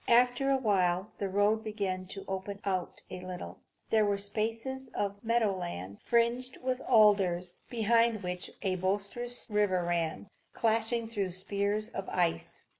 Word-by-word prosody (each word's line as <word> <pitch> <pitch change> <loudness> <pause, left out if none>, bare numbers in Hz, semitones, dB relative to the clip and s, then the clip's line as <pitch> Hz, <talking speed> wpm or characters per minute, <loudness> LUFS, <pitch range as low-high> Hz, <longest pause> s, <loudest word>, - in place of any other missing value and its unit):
After 245 +3 +4
a 270 - +4
while 195 -4 +1
the 200 - -1
road 205 +3 +2
began 195 -4 -3
to 195 +1 -7
open 195 +1 -4
out 185 -3 -2
a 185 - -6
little. 185 -1 -7 0.3
There 220 -1 +5
were 205 -1 +2
spaces 225 +6 -2
of 200 0 -2
meadow 230 -3 +2
land, 100 - -6
fringed 240 +2 +1
with 255 0 -2
alders, 195 -6 +4
behind 230 -1 +2
which 180 0 -3
a 185 -2 +1
boisterous 200 +6 -1
river 205 -4 +2
ran, 170 +1 -1 0.3
clashing 225 +1 +1
through 205 -4 -2
spears 200 +3 -1
of 195 -4 -5
ice. 170 -1 -1
205 Hz, 145 wpm, -31 LUFS, 185-230 Hz, 0.3 s, There